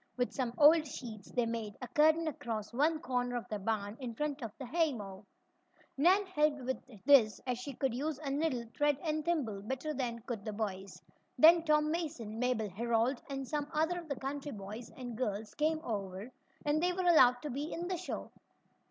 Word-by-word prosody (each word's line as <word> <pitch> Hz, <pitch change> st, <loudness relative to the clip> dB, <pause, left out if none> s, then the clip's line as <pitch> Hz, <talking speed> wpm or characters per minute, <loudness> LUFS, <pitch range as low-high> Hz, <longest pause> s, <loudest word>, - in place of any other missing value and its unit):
With 245 Hz, 0 st, 0 dB
some 245 Hz, -3 st, -2 dB
old 310 Hz, +1 st, +7 dB
sheets 225 Hz, -7 st, -8 dB
they 245 Hz, -2 st, +1 dB
made 225 Hz, -3 st, -4 dB
a 250 Hz, -, -6 dB
curtain 315 Hz, +4 st, +4 dB
across 225 Hz, -7 st, -4 dB
one 305 Hz, +6 st, +2 dB
corner 245 Hz, -5 st, -1 dB
of 240 Hz, -, -3 dB
the 210 Hz, -, -3 dB
barn, 205 Hz, +1 st, -2 dB
in 245 Hz, -4 st, -5 dB
front 295 Hz, +2 st, -2 dB
of 230 Hz, -3 st, -4 dB
the 265 Hz, -, -6 dB
haymow. 235 Hz, -, -2 dB, 0.7 s
Nan 370 Hz, +8 st, +4 dB
helped 300 Hz, -6 st, +1 dB
with 250 Hz, -5 st, -6 dB
this, 225 Hz, -8 st, +6 dB
as 250 Hz, -2 st, -1 dB
she 270 Hz, +1 st, -6 dB
could 265 Hz, -2 st, 0 dB
use 290 Hz, +4 st, -2 dB
a 285 Hz, -2 st, -4 dB
needle, 275 Hz, -5 st, 0 dB
thread 290 Hz, -1 st, +2 dB
and 310 Hz, -1 st, -1 dB
thimble 270 Hz, -13 st, -1 dB
better 265 Hz, +8 st, -3 dB
than 245 Hz, -4 st, -2 dB
could 235 Hz, -5 st, -5 dB
the 215 Hz, -, -4 dB
boys. 195 Hz, -3 st, -4 dB, 0.4 s
Then 330 Hz, +1 st, +8 dB
Tom 300 Hz, -1 st, +3 dB
Mason, 295 Hz, -10 st, -4 dB
Mabel 235 Hz, -5 st, 0 dB
Herold 235 Hz, +5 st, +1 dB
and 270 Hz, -1 st, -4 dB
some 295 Hz, 0 st, -2 dB
other 320 Hz, +3 st, +1 dB
of 335 Hz, -3 st, -11 dB
the 280 Hz, -, -1 dB
country 280 Hz, +2 st, -4 dB
boys 210 Hz, +3 st, -7 dB
and 245 Hz, -3 st, -6 dB
girls 215 Hz, -3 st, -3 dB
came 310 Hz, +1 st, +1 dB
over, 200 Hz, -, -4 dB, 0.3 s
and 295 Hz, +1 st, +2 dB
they 360 Hz, +1 st, +2 dB
were 370 Hz, -, -2 dB
allowed 255 Hz, -8 st, +6 dB
to 300 Hz, -, -3 dB
be 285 Hz, +5 st, -3 dB
in 345 Hz, +1 st, -3 dB
the 370 Hz, -1 st, -1 dB
show. 365 Hz, -, -5 dB
260 Hz, 195 wpm, -33 LUFS, 225-305 Hz, 0.7 s, Then